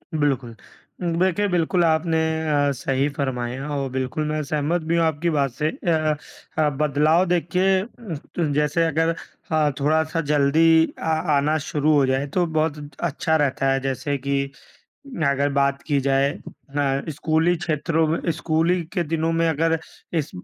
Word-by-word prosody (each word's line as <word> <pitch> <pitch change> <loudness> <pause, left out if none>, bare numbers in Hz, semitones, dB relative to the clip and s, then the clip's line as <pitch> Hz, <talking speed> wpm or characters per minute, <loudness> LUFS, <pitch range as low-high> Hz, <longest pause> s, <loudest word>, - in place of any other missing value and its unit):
बिल्कुल। 135 -6 0 0.6
देखिए, 190 +2 +2
बिल्कुल 175 -1 +1
आपने 160 0 +2 0.3
अ, 145 -1 +2
सही 135 +2 0
फ़रमाया 130 0 -3
और 135 -1 -2
बिल्कुल 130 +3 -2
मैं 155 0 -1
सहमत 150 +4 -1
भी 165 +2 -1
हूँ 165 - +3
आपकी 160 +2 0
बात 140 -4 +1
से। 150 +5 -1
अ - - -9 0.7
अ, - - +3
अ, 150 - +3
बदलाव 150 +4 +2
देखिए 180 +2 +2
अ, - - -5 0.5
त 160 -4 +1
जैसे 150 +3 +1
अगर 165 +1 +1 0.4
अ, 155 -2 +3
थोड़ा-सा 160 +3 +1
जल्दी 160 +3 +4
अ - - -13 0.4
आना 150 +3 +2
शुरू 150 +1 +2
हो 140 -2 +4
जाए, 130 +2 0
तो 175 +5 0
बहुत 155 -2 0
त 145 -1 -11
अच्छा 160 -1 0
रहता 135 -2 +1
है। 135 - +1
जैसे 135 +2 -2
कि 140 +1 -1 0.9
अगर 140 +1 +1
बात 140 0 +1
की 145 -3 +2
जाए 135 +1 +2 0.4
अ, 140 -1 0
स्कूली 160 +3 +1
क्षेत्रों 160 0 0
में 160 +2 0
स्कूली 165 +3 +1
के 180 -3 0
दिनों 165 +1 -1
में 165 0 +2
अगर 165 +1 +1 0.4
इस 150 - -1
150 Hz, 160 wpm, -23 LUFS, 140-165 Hz, 0.9 s, जल्दी